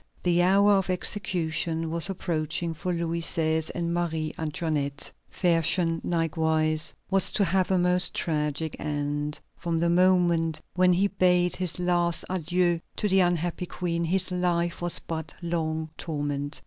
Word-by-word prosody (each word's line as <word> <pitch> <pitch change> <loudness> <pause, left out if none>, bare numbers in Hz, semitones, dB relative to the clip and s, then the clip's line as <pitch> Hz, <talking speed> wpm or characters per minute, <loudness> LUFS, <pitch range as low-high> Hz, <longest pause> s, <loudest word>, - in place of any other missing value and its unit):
The 175 -1 +3
hour 200 +3 +4
of 190 -1 -1
execution 170 -4 -1
was 170 +3 0
approaching 170 -2 -2
for 180 +3 -4
Louis 170 -1 -2
XVI. 160 -1 0
and 170 0 -2
Marie 160 -3 -2
Antoinette. 150 -2 -3 0.2
Fersen, 165 -1 +2
likewise, 160 -1 0 0.2
was 195 -1 +5
to 205 - +3
have 185 +1 +1
a 190 - +3
most 180 0 +2
tragic 150 -1 -2
end. 145 0 -3 0.2
From 170 -2 -1
the 170 +1 +2
moment 175 -3 +3
when 180 0 +4
he 190 +3 +3
bade 180 -2 +2
his 180 -1 -2
last 175 -1 +1
adieu 175 -1 +1 0.2
to 210 - 0
the 190 -1 +3
unhappy 175 0 0
Queen, 170 -1 -2
his 185 +2 0
life 175 -1 0
was 175 0 +1
but 160 -1 -6
one 170 -1 -6
long 160 -1 -2
torment. 145 -2 -3
170 Hz, 150 wpm, -26 LUFS, 160-180 Hz, 0.2 s, was